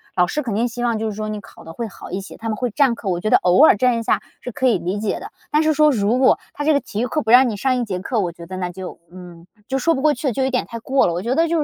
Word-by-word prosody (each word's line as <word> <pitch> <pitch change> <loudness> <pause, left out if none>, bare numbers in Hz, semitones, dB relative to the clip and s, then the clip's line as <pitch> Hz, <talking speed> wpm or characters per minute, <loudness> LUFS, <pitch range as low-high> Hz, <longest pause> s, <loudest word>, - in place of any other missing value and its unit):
老 180 -1 +3
师 300 - -2
肯 240 -7 -4
定 230 +4 +1
希 240 +1 -5
望 235 -2 +1
就 220 0 -2
是 210 - -6
说 215 0 -4
你 215 0 -4
考 - - -15
得 165 - -10
会 230 +6 -4
好 200 - -11
一 190 - -2
些， 195 - -11
他 225 - -5
们 215 - -1
会 250 +1 -1
占 270 +1 +3
课。 230 - -8
我 175 -2 -1
觉 215 - -1
得 - - +6
偶 180 - +5
尔 - - +6
占 250 +2 +2
一 - - -4
下 - - +1 0.2
是 250 - -6
可 260 +3 0
以 240 - +3
理 180 +4 -3
解 215 -1 -2
的， - - -8 0.2
但 305 +1 +2
是 310 0 +3
说 305 0 +4
如 225 0 +1
果 260 - +5 0.2
他 290 - -4
这 310 - +4
个 285 - +3
体 225 -3 -6
育 245 - 0
课 305 - -1
不 220 - -1
让 250 +1 +7
你 215 - -3
上 255 +5 +1
一 245 - 0
节 195 -4 -3
课， 225 +5 -2
我 180 -4 -1
觉 170 0 -12
得 185 +2 -7
那 180 -1 -3
就， 185 +1 -8
嗯， 175 -2 -12 0.2
就 270 - -1
说 330 +5 +2
不 265 - -3
过 305 +1 +4
去， 265 +1 -2
就 265 +4 -1
有 265 - +1
点 250 -1 -1
太 230 - -7
过 265 +4 +2
了。 170 - -1
我 175 - -3
觉 235 +5 -1
得 330 +2 +3
就 330 0 0
230 Hz, 380 characters per minute, -20 LUFS, 195-265 Hz, 0.2 s, 让